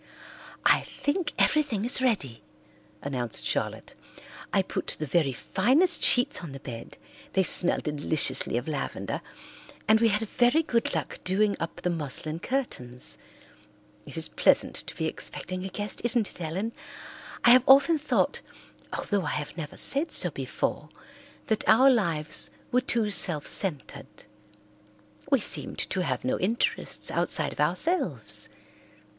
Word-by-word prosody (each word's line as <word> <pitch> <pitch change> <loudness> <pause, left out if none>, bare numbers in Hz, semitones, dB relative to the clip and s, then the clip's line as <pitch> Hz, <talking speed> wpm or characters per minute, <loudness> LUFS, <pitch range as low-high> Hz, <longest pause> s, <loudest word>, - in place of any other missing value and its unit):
"I - - +5
think 305 +1 -3
everything 280 -9 +1
is 250 +2 +4
ready," 195 - -1 0.6
announced 125 -4 -4
Charlotte. - - -3 0.6
"I - - +2
put - - -5
the 155 - -4
very 150 -1 +1
finest 265 - +1
sheets 245 0 +3
on 160 -6 -8
the 135 - -8
bed, 115 -4 -9 0.4
they 190 - +2
smell 175 0 +3
deliciously 150 -4 +2
of 120 - -4
lavender, 150 -3 -4 0.7
and 220 0 +5
we 230 - +3
had 215 +1 0
very 245 +9 +2
good 235 -6 -1
luck - - -4
doing 200 +2 +1
up 165 +1 -6
the 180 - -1
muslin 155 0 -3
curtains. 125 - -2 0.9
It - - -6
is - - +1
pleasant - - +2
to - - -7
be - - -3
expecting 185 0 -5
a 190 - -5
guest, 205 +2 -2
isn't 240 -3 +3
it, - - -13
Ellen? 190 +8 -4 0.7
I 240 - +8
have 250 0 +7
often 280 +4 +6
thought, 300 - 0 0.5
although 200 -3 -2
I - - -2
have 150 0 -6
never 155 -3 -7
said 290 +4 +1
so 175 - +1
before, 140 +2 -4 0.6
that 220 - -1
our 260 +5 +6
lives 155 - +1 0.2
were 250 - +2
too 230 -5 0
self 165 -7 +5
centred. 170 -9 -2 1.1
We 275 -4 +3
seemed - - 0
to 190 - -1
have 130 -8 -3
no 130 - -1
interests 220 +6 0
outside - - 0
of - - -16
ourselves. 115 - 0
190 Hz, 145 wpm, -26 LUFS, 150-240 Hz, 1.1 s, I